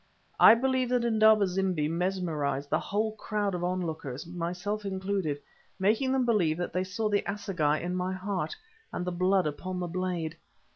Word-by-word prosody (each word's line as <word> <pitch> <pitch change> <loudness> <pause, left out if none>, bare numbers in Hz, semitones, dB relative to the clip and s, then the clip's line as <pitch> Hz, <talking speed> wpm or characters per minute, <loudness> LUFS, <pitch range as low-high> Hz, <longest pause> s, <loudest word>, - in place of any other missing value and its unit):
I - - +9
believe 260 0 +1
that 245 -1 +1
Indaba 220 -2 +5
zimbi 185 -4 0
mesmerized 160 -5 -1
the - - +3
whole 215 +2 -1
crowd 210 -2 -1
of 175 -1 -3
onlookers, 160 -7 -3
myself 180 +5 -3
included, 190 -6 -2 0.4
making 220 +7 +2
them 265 -1 +2
believe 180 -10 +2
that 175 - -3
they 180 - +1
saw 195 +4 -2
the 205 -1 +2
assegai 185 -7 0
in 180 +2 -3
my 185 0 -1
heart, 185 -4 -3 0.4
and 180 - -3
the 180 - -1
blood 185 +1 +2
upon 180 +5 -3
the 180 - -2
blade. 175 -2 -3
185 Hz, 165 wpm, -29 LUFS, 170-205 Hz, 0.4 s, I